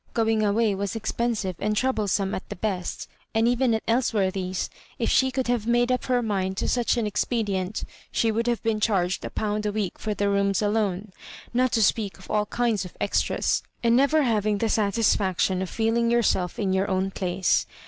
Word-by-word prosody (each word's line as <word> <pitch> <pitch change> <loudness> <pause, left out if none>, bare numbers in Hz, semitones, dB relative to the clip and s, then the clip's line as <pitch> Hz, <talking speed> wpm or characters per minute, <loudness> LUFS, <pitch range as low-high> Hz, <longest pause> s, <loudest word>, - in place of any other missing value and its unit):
Going 225 -1 +2
away 210 +1 +2
was 195 0 -3
expen 235 +1 -1
sive 190 -3 -3
and 210 +1 -1
troublesome 205 -6 0
at - - -5
the - - -5
best; 185 -2 -3 0.3
and 225 +1 +3
even 245 -1 +2
at 220 - -3
Elsworthy's, 195 -6 0 0.3
if - - 0
she 260 - +4
could 260 0 -2
have 240 -2 -1
made 240 +1 +3
up 250 - 0
her 250 -2 +1
mind 190 -3 -1
to - - -1
such 245 0 +1
an 230 - 0
expedient, 205 -2 -1 0.3
she 225 - +1
would 230 +2 -1
have 240 -1 0
been 225 -2 0
charg 190 -4 +1
ed - - -3
a - - -7
pound 210 0 -2
a - - 0
week 205 -4 -3
for 215 -1 -3
the 205 - 0
rooms 200 -1 +1
alone, 205 -2 0 0.4
not 255 +1 +2
to 225 - +3
speak 205 0 +1
of 185 - -11
all 210 0 +1
kinds 230 -5 0
of 180 - -11
extras, - - +1 0.2
and 235 0 +4
never 280 +4 +4
having 215 -4 +1
the 225 +2 0
satisfaction 200 -3 +1
of 190 - -3
feeling 230 +1 +1
yourself 215 -6 +1
in 195 -3 0
your 190 +1 +1
own 190 0 0
place. 185 -1 0
215 Hz, 200 wpm, -25 LUFS, 195-235 Hz, 0.4 s, she